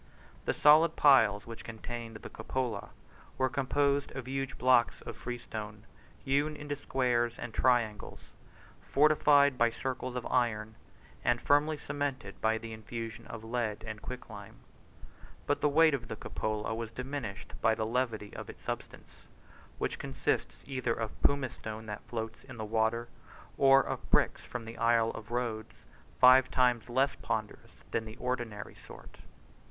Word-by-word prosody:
The - - +1
solid 155 +2 +6
piles 110 -8 +5
which 115 -1 -9
contained 115 0 -7
the 110 - -8
cupola 115 -2 -3 0.5
were 130 0 +2
composed 140 +1 +1
of 130 -2 -5
huge 135 -1 -3
blocks 125 -2 +3
of - - -7
freestone, 110 -3 -6 0.4
hewn 145 +3 +1
into 145 -1 -4
squares 120 -4 0
and 120 -2 -6
triangles, 115 -5 +1 0.6
fortified 145 -2 +4
by 120 0 +5
circles 130 +2 -4
of 125 - -3
iron, 110 -4 0 0.5
and 120 0 +2
firmly 150 +3 +3
cemented 140 -8 -4
by 110 0 +2
the 115 0 -7
infusion 115 +1 -7
of 115 -1 -8
lead 110 -2 -2
and 110 -1 -6
quicklime: 110 -5 -8 0.9
but 145 - 0
the 150 - +4
weight 160 +1 +5
of 120 -4 -2
the - - -5
cupola 110 +1 -3
was 115 0 -4
diminished 125 -4 -5
by 110 -1 +4
the 110 - -1
levity 115 -3 -2
of - - -7
its - - -11
substance, - - -7 0.5
which - - -2
consists - - -2
either 130 -4 -1
of 115 -2 -5
pumice 140 -3 +2
stone 110 0 -7
that 105 -1 -6
floats 115 -1 -5
in 130 -3 -10
the 110 - -4
water, 110 +2 +1 0.5
or 135 0 +6
of - - -5
bricks - - +3
from 120 -2 -6
the 115 +1 -9
Isle 115 -1 +3
of 105 - -9
Rhodes, 115 -2 -3 0.4
five 130 0 +8
times 125 -2 +2
less 135 +3 +2
ponderous 110 -2 -4
than 110 - -1
the 110 0 -9
ordinary 120 -5 -3
sort. - - -14
120 Hz, 150 wpm, -31 LUFS, 110-135 Hz, 0.9 s, five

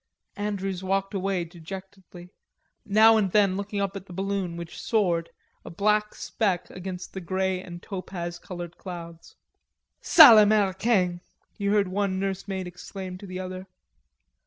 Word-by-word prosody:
Andrews 195 -2 -3
walked 195 +2 -1
away 195 -2 -1
dejectedly, 180 +1 -11 0.6
now 220 +2 +6
and 200 -4 +1
then 200 -2 +3
looking 200 +1 -4
up 200 0 -2
at 195 0 -8
the 180 - -10
balloon, 195 -2 -2
which 170 -1 -8
soared, 175 -7 +1 0.3
a - - -9
black 210 +4 +1
speck 195 -6 -2
against 185 0 -7
the 190 - -5
grey 185 +1 -1
and 175 -2 -10
topaz 175 -3 -6
colored 175 -2 -8
clouds. 170 -3 -9 0.7
"Sale 260 -10 +9
Americain!" 200 -3 +2 0.3
he 200 -2 -3
heard 200 -1 +3
one 190 0 -1
nursemaid 195 -1 -3
exclaim 180 +1 -8
to 200 - -10
the 185 0 -6
other. 185 0 -6
190 Hz, 140 wpm, -26 LUFS, 180-200 Hz, 0.7 s, Sale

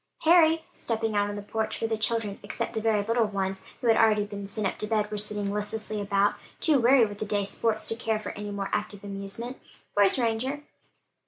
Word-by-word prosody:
"Harry," 325 -1 +5
stepping 225 -2 -2
out 205 0 +2
on 205 - -4
the 205 - -6
porch 220 +1 -2
where 225 - 0
the 225 - 0
children, 215 -2 -1
except - - -4
the 220 - -2
very 215 -2 +2
little 230 +2 +2
ones, 190 -1 -3
who 245 - -1
had 225 - +6
already 215 -2 +4
been 200 -1 -7
sent 205 +1 -3
up 190 - 0
to 210 - -1
bed, 210 -1 0
were 210 - -2
sitting 205 -1 -3
listlessly 210 0 -3
about, 200 0 +2 0.3
too 300 -4 +4
weary 245 0 +6
with 205 -1 -7
the - - -1
day's 205 -1 -1
sports 220 -2 0
to 225 - 0
care 225 -1 -1
for 215 - -6
anymore 205 -1 -4
active 205 -1 -2
amusement, 200 +5 -5 0.3
"where's 205 +2 +4
Ranger?" 255 +5 -1
215 Hz, 215 wpm, -27 LUFS, 205-225 Hz, 0.3 s, had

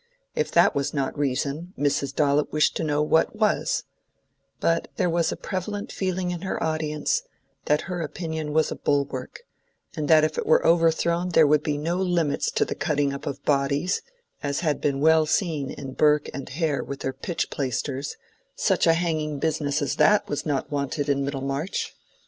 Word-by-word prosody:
If - - -1
that - - +5
was 140 +1 -1
not 135 -2 -1
reason, 145 +5 -2
Mrs. 140 -1 0
Dollop 145 0 +2
wished 150 0 +2
to - - -2
know 150 -1 +1
what 160 +6 +2
was; 215 -1 +1 0.8
but 165 0 +1
there 180 -2 +1
was 170 -1 +1
a - - -2
prevalent 200 +2 -4
feeling 185 -1 -2
in 175 -2 -4
her 190 - -3
audience 155 - 0 0.4
that 150 0 +2
her 180 -2 -4
opinion 160 -1 -4
was 155 +1 +2
a - - -2
bulwark, 140 - -2 0.5
and 150 -2 -2
that 155 0 +6
if 155 0 0
it - - -3
were 155 - +4
overthrown 170 +1 +3
there 165 -2 +5
would 150 0 +4
be 150 -1 -1
no 165 +4 -1
limits 175 -6 +1
to - - +1
the - - -3
cutting 145 -3 0
up 140 - -7
of 140 - -5
bodies, 140 +5 +1 0.4
as 140 +1 -2
had 150 -4 0
been 140 -1 0
well 160 0 +5
seen 155 -5 0
in 135 -2 -7
Burke 150 +1 +3
and 135 -1 -6
Hare 150 0 -1
with 140 0 -7
their 135 - -2
pitch 165 +6 -3
plaisters—such 145 - -2
a 165 - +6
hanging 155 -3 -1
business 145 -1 0
as 140 - -2
that 210 0 +4
was 145 - -3
not 145 0 -1
wanted 145 +1 -2
in 140 -1 +2
Middlemarch! 140 +5 -3
150 Hz, 180 wpm, -25 LUFS, 140-170 Hz, 0.8 s, that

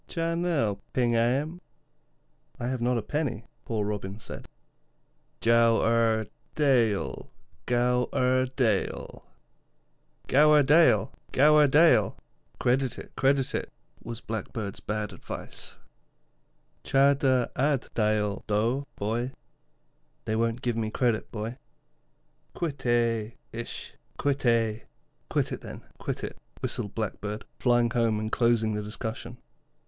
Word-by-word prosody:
'Cha 165 0 -1
nel 155 - 0
ping 120 -2 +2
aym.' 140 +9 +1 1.0
'I - - -3
have 130 -2 -3
not 125 +1 +2
a 115 - -2
penny,' 125 -5 -2 0.2
poor 110 -3 -1
Robin 100 -1 -4
said. 110 - -9 0.9
'Gow 115 0 +4
er 115 -1 +2 0.3
dayl, 115 - +1 0.4
gow 125 0 +2
er 130 0 +2
dayl.' 110 -7 -1 1.0
'Credit 150 +2 +5 1.9
it, - - -9
credit 135 0 +2
it,' - - -3 0.3
was 115 0 -7
Blackbird's 110 -2 -5
bad 105 -1 -3
advice. 90 - -8 1.1
'Cha 140 +1 +4
der 130 -3 +1
ad 140 -1 +1
dayl 105 -2 0
dou, 115 +7 0
boy.' 115 +5 -2 0.9
'They 110 - -1
won't 115 +1 0
give 120 -2 0
me 110 -1 -1
credit, 115 -1 0
boy.' 115 +3 -5 1.0
'Quit 160 -5 -3
eh, 115 -2 +1 0.2
eisht, 115 +1 -6 0.3
quit 140 -2 0
eh.' 115 -2 +2 0.5
'Quit - - 0
it, - - -5
then, - - -9 0.2
quit - - -4
it,' - - -6 0.2
whistled 100 - -3
Blackbird, 105 -1 -4
flying 120 -2 +3
home 115 -3 +1
and 110 0 -3
closing 115 -2 +2
the 105 - -2
discussion. 110 +2 -6
115 Hz, 110 wpm, -27 LUFS, 110-130 Hz, 1.9 s, Credit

